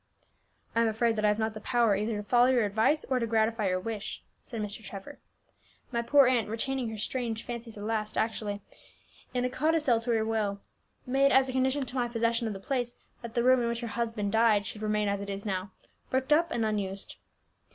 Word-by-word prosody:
"I 230 - +4
am 230 - +3
afraid 225 +1 +1
that 215 -1 0
I - - +6
have 210 0 +2
not 220 0 -1
the 215 - -8
power 235 -4 +3
either 210 +2 -1
to 205 - -4
follow 245 0 +5
your 250 -4 +3
advice 220 +9 +2
or 260 -1 0
to 230 - -1
gratify 220 -1 +1
your 185 0 +1
wish," 215 +1 -5 0.2
said 230 - -7
Mr. 210 +1 -5
Trevor. 195 -1 -9 0.7
"My 235 -1 0
poor 275 +4 +5
aunt, 245 -4 +2
retaining 245 +2 -2
her 220 - -6
strange 230 0 -2
fancy 235 -1 -6
to 215 - -12
the - - -5
last, 215 -1 -2
actually 210 -2 -1 0.7
in 250 0 +1
a - - +1
codicil 295 -4 +2
to 235 - -6
her 220 -1 +2
will 215 -3 -1 0.5
made 275 +2 +3
as 265 0 +4
a - - -1
condition 265 +2 +1
to 255 - -8
my 245 -2 +1
possession 230 0 0
of 215 - -2
the 195 - -7
place 245 +2 -2 0.3
that 235 -2 -8
the 235 - +2
room 255 0 +5
in 235 - 0
which 235 0 -2
her 235 - -3
husband 225 -3 -1
died 220 -2 +4
should 210 - -7
remain 210 -1 +1
as 200 0 -1
it 200 - -6
is 200 +1 -5
now, 190 -1 -2 0.4
bricked 260 +3 +2
up 335 +3 +3
and 230 -5 0
unused." 200 -2 -3
230 Hz, 225 wpm, -29 LUFS, 210-245 Hz, 0.7 s, I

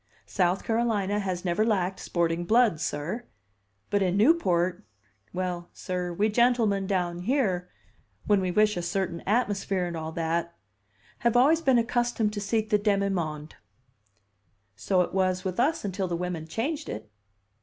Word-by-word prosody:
South 185 0 0
Carolina 220 -3 0
has 185 -2 -3
never 175 +4 +1
lacked 190 -4 0
sporting 170 0 -1
blood, 220 -3 +3
sir. 170 +11 -3 0.7
But 205 - +2
in 185 0 +1
Newport 185 - +2 0.5
well, 180 -1 -3
sir, 180 -1 -3
we 200 +5 +1
gentlemen 220 -3 +2
down 175 -3 -1
here, 185 -5 0 0.6
when 205 -2 +3
we 185 - -1
wish 210 +3 +3
a 175 - -2
certain 170 -1 -2
atmosphere 200 -4 0
and 175 -1 -4
all 160 0 -4
that, 170 +1 -2 0.6
have 235 0 +2
always 305 +6 +5
been 265 -5 +4
accustomed 235 -2 0
to 205 - -4
seek 215 +2 -1
the 210 - +4
demi 200 -1 +1
monde." 155 -5 -4 1.2
"So 180 - +1
it - - -2
was 185 -1 +1
with 185 +1 -3
us 285 0 +1
until 190 -1 -2
the 175 - -2
women 175 -2 -4
changed 285 - -3
it." 110 0 -7
190 Hz, 155 wpm, -27 LUFS, 175-220 Hz, 1.2 s, always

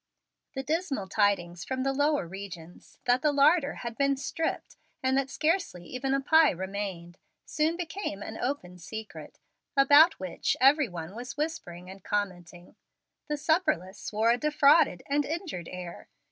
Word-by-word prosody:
The 265 - -3
dismal 300 - -2
tidings 190 -4 0
from 260 0 -3
the 270 0 0
lower 290 - +1
regions, 175 -2 -10
that 245 +1 +3
the 300 - +3
larder 290 +1 +3
had 235 -1 -4
been 275 -1 +2
stripped 320 +4 -3 0.3
and 260 0 +2
that 270 0 0
scarcely 305 - -1
even 265 +4 -2
a - - +1
pie 315 +3 +5
remained, 190 -2 -5 0.3
soon 315 +3 0
became 335 - -4
an 220 - -7
open 205 -9 -4
secret, 220 +5 -9 0.4
about 285 +5 +6
which 185 -2 -2
every 275 +1 +5
one 170 0 -7
was 245 +6 -7
whispering 180 - -4
and 190 0 -11
commenting. 180 -4 -4 0.5
The 300 -1 -2
supperless 300 - 0
wore 220 +2 +3
a 240 - +1
defrauded 295 - +4
and 290 +1 +1
injured 310 - -5
air. 180 -1 -8
255 Hz, 150 wpm, -28 LUFS, 185-295 Hz, 0.5 s, about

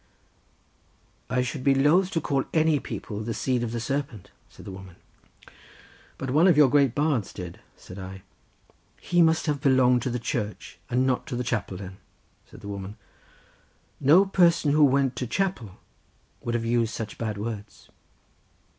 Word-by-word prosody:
"I 125 0 +1
should 130 +1 -5
be 135 0 +4
loth 160 +7 +3
to 165 - 0
call 135 -2 0
any 155 -2 +3
people 105 -4 -6
the 110 +1 -4
seed 125 -2 0
of 120 -2 -3
the 120 - -3
serpent," 135 -4 -4 0.2
said - - -15
the - - -7
woman. 95 -2 -11 1.2
"But 135 -1 -4
one 155 +7 +5
of 175 -5 +4
your 145 -4 +6
great 140 -4 +3
bards 145 -8 0
did," 90 -2 -8 0.2
said 90 +2 -11
I. 95 0 -9 0.8
"He 175 0 +1
must 160 0 +3
have 145 -3 -1
belonged 130 -3 +4
to 130 - -2
the 125 - -2
Church, 115 -3 -4
and 125 +1 +1
not 130 -1 0
to 125 - -4
the 125 - -2
chapel 110 -6 -3
then," 95 -1 -9 0.5
said - - -14
the - - -9
woman. 100 0 -6 1.0
"No 160 +8 +6
person 170 -6 +3
who 150 +1 +4
went 135 -1 +2
to 125 - -3
chapel 180 - -2 0.7
would 120 0 -3
have 115 -1 -1
used 115 -1 0
such 110 -2 -6
bad 110 -2 -3
words." 105 -1 -7
125 Hz, 170 wpm, -26 LUFS, 110-145 Hz, 1.2 s, your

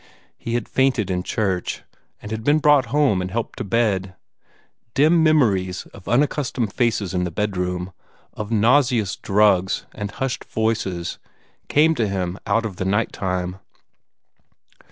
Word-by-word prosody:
He 115 - -4
had 120 - -2
fainted 130 -7 +1
in 90 -1 0
church, 95 -2 -2 0.4
and 105 - -7
had 110 0 -4
been 145 +4 +4
brought 145 -3 +4
home 140 -11 +2
and 90 - -3
helped 115 +4 -4
to - - -2
bed. 100 -3 0 0.8
Dim 160 +4 +4
memories 105 - +2
of 95 - -14
unaccustomed 125 -4 0
faces 110 -6 0
in 90 -1 0
the 90 - -1
bedroom, 90 -1 -2 0.4
of 105 -1 -6
nauseous 115 -2 +3
drugs 95 -2 +2
and 105 -1 -5
hushed 130 +5 -3
voices, 95 -6 -2 0.5
came 160 +2 +4
to 115 -8 0
him 95 -1 -3
out 115 0 +1
of 100 -5 -5
the 95 - -3
night 105 +4 +1
time. 90 -1 -2
105 Hz, 145 wpm, -22 LUFS, 95-125 Hz, 0.8 s, been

